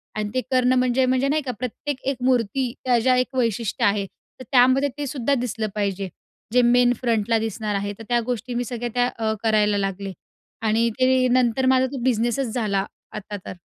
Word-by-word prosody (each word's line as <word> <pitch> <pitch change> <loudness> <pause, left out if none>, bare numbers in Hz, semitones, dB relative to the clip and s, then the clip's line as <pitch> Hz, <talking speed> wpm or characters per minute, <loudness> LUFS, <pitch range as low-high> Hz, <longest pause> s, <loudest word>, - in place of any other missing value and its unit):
आणि 210 -1 -2
ते 255 - +1
करणं 255 0 +3
म्हणजे 255 +1 +2
म्हणजे 260 +1 +1
नाही 305 +2 +1
का? 265 -3 -4
प्रत्येक 255 +3 -4
एक 275 -1 0
मूर्ती 250 0 +1
त्या 250 -2 +4
ज्या 255 +2 +3
एक 255 +1 -1
वैशिष्ट्य 230 -3 0
आहे. 200 0 +2 0.3
तर - - -7
त्यामध्ये 260 +2 +4
तेसुद्धा 280 -2 -1
दिसलं 235 -3 -2
पाहिजे 200 -2 -2 0.4
जे 250 - +5
मेन 245 0 +4
फ्रंटला 230 -2 +1
दिसणार 215 -1 -3
आहे. 200 +1 -2
तर - - -8
त्या 240 0 +3
गोष्टी 245 0 -3
मी 245 - 0
सगळ्या 240 +1 -4
त्या 245 0 +3
अ, 220 -1 0
करायला 210 -2 +3
लागले. 195 0 -3 0.5
आणि 225 +1 +2
ते 255 0 +4
नंतर 250 0 +2
माझा 260 0 +3
तो 280 - -5
बिझनेसच 240 0 0
झाला 200 -5 0 0.3
आता 210 0 -6
तर. - - -6
245 Hz, 190 wpm, -23 LUFS, 215-255 Hz, 0.5 s, जे